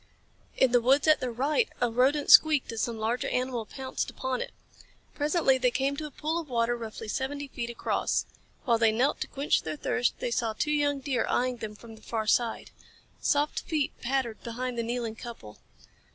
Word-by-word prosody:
In 260 - +4
the 245 0 +4
woods 270 +5 +3
at 310 -1 +6
their 255 - -2
right 290 - +1
a 245 -1 +1
rodent 270 +5 +2
squeaked 305 -6 +7
as 225 -1 -3
some 235 -2 -2
larger 225 +3 -1
animal 250 -3 -2
pounced 265 -1 -4
upon 260 -1 -3
it. - - -5 0.6
Presently 295 -3 +2
they 250 0 +3
came 275 +3 0
to 305 +2 -5
a - - -10
pool 310 +4 -2
of 320 -4 -8
water 235 -1 +1
roughly 225 -1 -7
seventy 280 +5 -3
feet 240 -2 -5
across. 235 - -1 0.4
While 235 -3 +3
they 225 -1 +5
knelt 255 +7 +1
to - - -2
quench 280 +2 +1
their 155 -1 -4
thirst 245 +9 0
they 240 - -3
saw 230 -1 0
two 300 +7 -1
young 290 -2 +1
deer 260 -3 -1
eyeing 250 0 +1
them 215 -2 -6
from 225 +1 -12
the 220 - -17
far 220 0 -3
side. 230 +1 +1 0.5
Soft 290 0 +1
feet 305 -4 -1
pattered 250 -3 -1
behind 245 +2 -4
the 235 - -1
kneeling 230 -1 -3
couple. 225 - -10
250 Hz, 195 wpm, -28 LUFS, 230-280 Hz, 0.6 s, squeaked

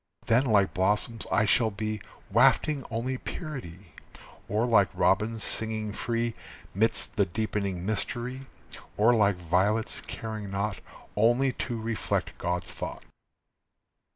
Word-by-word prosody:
Then 120 +4 +3
like 100 -4 +3
blossoms 105 +4 0
I 110 - +4
shall 110 +2 +3
be, 110 0 -3 0.3
Wafting 135 +5 +4
only 125 +2 -2
purity, 100 - -7 0.6
Or 105 +4 +2
like 100 -6 +4
robins, 110 +3 +2
singing 110 -1 -1
free 115 +1 -1 0.4
'Midst 110 +4 0
the - - +4
deepening 100 -1 -2
mystery, 120 +5 -3 0.5
Or 115 +4 +5
like 100 -4 +4
violets, 95 +6 0
caring 110 -2 -5
naught 100 +1 -2 0.4
Only 120 +5 +3
to 120 -1 -3
reflect 115 0 -2
God's 90 0 -2
thought." - - -6
110 Hz, 120 wpm, -28 LUFS, 100-120 Hz, 0.6 s, Or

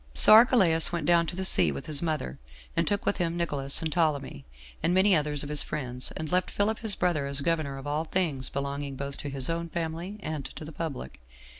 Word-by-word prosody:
So - - +7
Archelaus 215 -8 +5
went 170 -3 -3
down 170 0 +3
to 175 - -5
the 190 +1 -1
sea 90 - +6
with 70 - -6
his 150 -2 -2
mother, 155 - -3 0.4
and - - 0
took 205 -1 -1
with - - 0
him 170 -2 -1
Nicolaus 145 -4 -1
and 160 - -2
Ptolemy, 145 - -1 0.4
and 175 - +1
many 190 0 +5
others 150 -2 +1
of 145 - -7
his 150 -1 +3
friends, 125 -4 -4
and 155 -1 -5
left 180 0 +1
Philip 215 +2 -1
his 220 -4 0
brother 155 -6 0
as 140 0 0
governor 155 -3 -1
of 135 - -9
all 150 +2 -2
things 155 -7 -2
belonging 140 0 -4
both 140 +1 -6
to 145 - -6
his 135 -2 +1
own 170 0 -3
family 170 +4 -5
and 155 -2 -4
to 155 - -8
the 155 - -9
public. 140 - -6
155 Hz, 225 wpm, -27 LUFS, 140-175 Hz, 0.4 s, So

